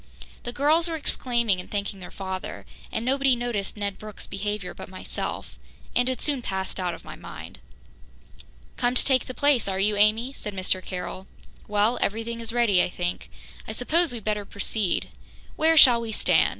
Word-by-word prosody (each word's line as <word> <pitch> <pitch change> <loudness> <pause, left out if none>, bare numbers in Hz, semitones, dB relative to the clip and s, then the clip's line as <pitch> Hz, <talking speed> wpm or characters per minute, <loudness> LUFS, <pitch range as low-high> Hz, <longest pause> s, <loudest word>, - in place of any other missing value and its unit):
The 240 - -3
girls 305 +6 +3
were 330 - -2
exclaiming 235 -9 +1
and 180 - -8
thanking 200 -1 -3
their 180 - -8
father, 190 -1 -5 0.3
and 220 - -2
nobody 270 0 +3
noticed 235 -4 -3
Ned 200 -1 -3
Brooke's 215 -1 -8
behaviour 205 -1 -3
but - - -9
myself, 185 - -5 0.4
and 245 +1 +3
it 260 - -3
soon 285 -4 +1
passed 190 -3 -3
out 180 -2 -1
of - - -15
my - - -8
mind. - - -10 1.2
"Come 245 +1 +1
to - - +4
take 260 -2 +3
the 255 - -7
place, 285 -7 +3
are 190 -1 -1
you, 205 +2 +2
Amy?" 220 +5 +3
said 210 -6 -7
Mr. 185 0 0
Carroll. 185 +1 -5 0.4
"Well, 210 +3 +2
everything 225 +2 -1
is 230 0 -1
ready, 230 -6 +4
I - - +1
think. 175 0 -4 0.4
I 220 - -4
suppose 320 +8 +2
we'd 235 -3 -5
better 210 -1 -1
proceed. 200 -1 -1 0.5
Where 320 +1 +4
shall 245 -5 +9
we 230 -1 -4
stand? - - +4
220 Hz, 180 wpm, -26 LUFS, 195-250 Hz, 1.2 s, shall